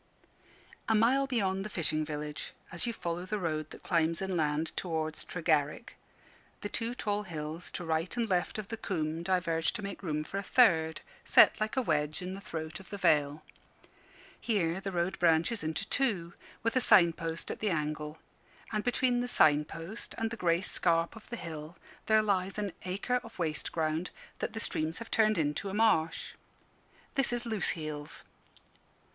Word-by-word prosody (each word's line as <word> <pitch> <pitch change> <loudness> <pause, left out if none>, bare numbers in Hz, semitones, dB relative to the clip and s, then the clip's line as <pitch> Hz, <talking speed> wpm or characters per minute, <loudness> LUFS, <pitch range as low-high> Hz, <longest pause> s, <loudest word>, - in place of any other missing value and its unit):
A 225 - +4
mile 255 +5 +4
beyond 195 -7 0
the 210 - -5
fishing 155 -4 0
village, 150 0 -5 0.2
as 175 +6 -1
you - - +1
follow 175 -5 -3
the 210 +3 -2
road 155 -4 -2
that - - -12
climbs 165 -2 +1
inland 160 -5 0
towards 160 -3 -2
Tregarrick, 155 +2 0 0.7
the 205 - -3
two 230 +3 -2
tall 205 -3 -1
hills 160 -3 -6
to 175 - -5
right 165 +6 -1
and 235 -1 +1
left 180 -1 0
of 215 -2 -5
the 225 - -4
coombe 160 -5 -2
diverge 170 -3 +1
to 210 - -5
make 200 - -5
room 155 -5 -1
for 195 +6 -4
a - - -2
third, 170 -8 +4 0.2
set - - +6
like 215 +4 -1
a 260 - +3
wedge 150 -4 0
in 180 +1 -5
the 195 - -7
throat 160 -4 -5
of 190 - -14
the 205 - -5
vale. 150 -5 +2 1.0
Here 190 -5 0
the 195 - -3
road 175 +1 -1
branches 170 +5 +3
into 160 +6 -2
two, 195 -11 +1 0.3
with 230 +2 +1
a 255 - +4
sign 170 -7 +6
post 165 0 -4
at - - -6
the 215 - +1
angle; 150 -2 -2 0.5
and 215 -1 -1
between 245 0 +2
the 245 - -2
sign 150 -9 +4
post 165 +9 -8
and 225 0 -1
the - - -3
grey 170 -4 +2
scarp 170 -1 +1
of 220 - -13
the 240 - -3
hill 160 -4 -7 0.3
there 215 0 +5
lies 195 -2 0
an 205 -3 -2
acre 200 +7 0
of 230 - -12
waste 160 -3 0
ground 160 +1 -1 0.3
that - - -3
the 225 - -4
streams 160 -6 -2
have 230 - -8
turned 215 -2 +4
into 155 +5 0
a 190 - -4
marsh. 210 -8 +2 0.8
This 275 -4 +1
is 240 0 -2
Loose 220 -5 0
heels. 150 -2 -6
175 Hz, 180 wpm, -31 LUFS, 160-215 Hz, 1.0 s, set